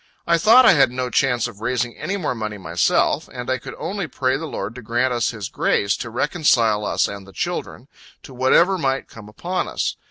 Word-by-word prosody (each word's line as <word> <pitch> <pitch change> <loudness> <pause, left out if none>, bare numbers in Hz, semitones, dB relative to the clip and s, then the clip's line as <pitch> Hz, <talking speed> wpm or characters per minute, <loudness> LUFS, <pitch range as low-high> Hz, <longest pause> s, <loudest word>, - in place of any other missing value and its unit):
I 170 0 +3
thought 235 +8 +7
I - - +8
had 140 - +4
no 125 0 -4
chance 125 -3 +1
of 110 -4 -12
raising 120 0 -1
any 200 - -3
more 170 -9 -2
money 110 -3 -5
myself, 85 -2 +1
and 125 0 -5
I 130 - 0
could - - -9
only 195 -3 -4
pray 130 -1 -1
the 160 +4 -4
Lord 105 -6 -5
to 125 - -9
grant 120 +3 0
us 120 -1 0
His 105 -4 -5
grace, 100 0 0
to 115 - -6
reconcile 115 -5 +1
us - - +1
and 100 -1 -8
the - - -13
children, - - -4 0.4
to - - -12
whatever 170 +9 +3
might 135 -2 -1
come 110 -2 -13
upon 175 - -3
us. - - -2
125 Hz, 215 wpm, -21 LUFS, 110-145 Hz, 0.4 s, I